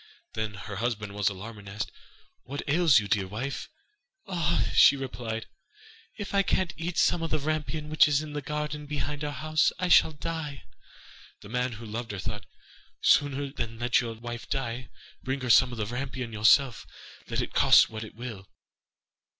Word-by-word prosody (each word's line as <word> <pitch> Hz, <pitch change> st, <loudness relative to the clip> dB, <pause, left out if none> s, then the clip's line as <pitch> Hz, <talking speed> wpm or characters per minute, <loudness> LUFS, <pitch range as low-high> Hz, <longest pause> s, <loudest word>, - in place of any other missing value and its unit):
Then 110 Hz, -2 st, -3 dB
her 100 Hz, 0 st, -7 dB
husband 105 Hz, -2 st, -2 dB
was 105 Hz, -1 st, +1 dB
alarmed, 105 Hz, +3 st, -8 dB
and 100 Hz, -1 st, -11 dB
asked: 105 Hz, +1 st, -4 dB, 0.5 s
'What 140 Hz, +3 st, -6 dB
ails 155 Hz, -1 st, +5 dB
you, 105 Hz, -3 st, +1 dB
dear 100 Hz, -2 st, +1 dB
wife?' 120 Hz, +8 st, -4 dB, 0.6 s
'Ah,' 170 Hz, -2 st, 0 dB
she -, -, +7 dB
replied, 120 Hz, -4 st, -4 dB, 0.7 s
'if 205 Hz, -3 st, -6 dB
I 200 Hz, -, +5 dB
can't 185 Hz, -1 st, 0 dB
eat 165 Hz, +2 st, -4 dB
some 175 Hz, -, +3 dB
of 165 Hz, -, -2 dB
the 155 Hz, -, +1 dB
rampion, 155 Hz, +1 st, -2 dB
which 155 Hz, -1 st, +5 dB
is 145 Hz, -1 st, +3 dB
in 150 Hz, -1 st, -8 dB
the 145 Hz, -, -3 dB
garden 150 Hz, +1 st, -4 dB
behind 145 Hz, 0 st, -3 dB
our 150 Hz, -, -2 dB
house, 155 Hz, +4 st, +1 dB
I 180 Hz, 0 st, -1 dB
shall 160 Hz, -, +6 dB
die.' 150 Hz, -, -5 dB, 0.8 s
The 100 Hz, -, -11 dB
man, 125 Hz, +1 st, -1 dB
who 115 Hz, +1 st, -9 dB
loved 115 Hz, +2 st, -5 dB
her, -, -, -4 dB
thought: 105 Hz, +2 st, -5 dB, 0.5 s
'Sooner 140 Hz, -1 st, +3 dB
than 115 Hz, -4 st, -4 dB
let 120 Hz, +1 st, +2 dB
your 115 Hz, -2 st, -5 dB
wife 120 Hz, +1 st, -7 dB
die, 130 Hz, -2 st, -3 dB, 0.3 s
bring 130 Hz, +1 st, -3 dB
her 125 Hz, -2 st, +1 dB
some 130 Hz, +1 st, +6 dB
of 120 Hz, -, -6 dB
the 105 Hz, -, -1 dB
rampion 125 Hz, 0 st, -4 dB
yourself, 110 Hz, +4 st, +4 dB, 0.4 s
let -, -, -2 dB
it -, -, -3 dB
cost -, -, +6 dB
what 110 Hz, 0 st, -5 dB
it 110 Hz, -, -11 dB
will. 110 Hz, -5 st, -8 dB
130 Hz, 185 wpm, -28 LUFS, 110-150 Hz, 0.8 s, she